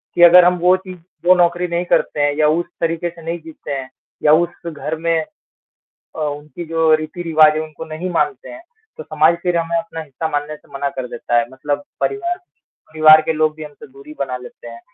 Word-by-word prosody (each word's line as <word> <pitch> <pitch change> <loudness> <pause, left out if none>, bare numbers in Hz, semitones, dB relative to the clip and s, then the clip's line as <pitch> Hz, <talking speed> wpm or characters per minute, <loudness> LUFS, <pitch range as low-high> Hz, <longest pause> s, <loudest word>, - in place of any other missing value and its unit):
कि 175 - +1
अगर 175 +1 +9
हम 180 0 +3
वो 180 +2 +4
चीज़ 185 -1 -11 0.3
वो 185 - +8
नौकरी 175 0 +2
नहीं 170 +1 -2
करते 150 - +1
हैं 145 0 +2
या 155 -1 +3
उस 175 - -3 0.2
तरीके 165 +1 -1
से 170 0 -14
नहीं 165 +1 -4
जीते 160 -2 -10
हैं 135 -2 -4 0.3
या 150 - +6
उस 170 +1 0
घर 155 +1 -4
में 165 0 0 0.9
अ, - - -7
उनकी 150 +2 -5
जो 165 -1 +2
रीति-रिवाज 155 -1 +2
है 155 - -1
उनको 155 0 -8
नहीं 160 +4 -5
मानते 375 - -1
हैं, 315 - -10 0.4
तो 475 - -7
समाज 160 - +3
फिर 180 -1 +1
हमें 170 0 -1
अपना 165 -1 -5
हिस्सा 155 +1 -5
मानने 150 0 -3
से - - -22
मना 140 +1 -2
कर 130 -2 -6
देता 120 0 -2
है। 120 - -1
मतलब 145 - -3 0.2
परिवार, 355 -4 -1 0.5
परिवार 155 0 +7
के 160 - -1
लोग 155 0 +1
भी 155 - -8
हमसे 150 -1 -12
दूरी 140 +3 -13
बना 130 -2 -2
लेते 125 -1 -13
हैं। 115 0 -11
160 Hz, 215 wpm, -18 LUFS, 150-175 Hz, 0.9 s, अगर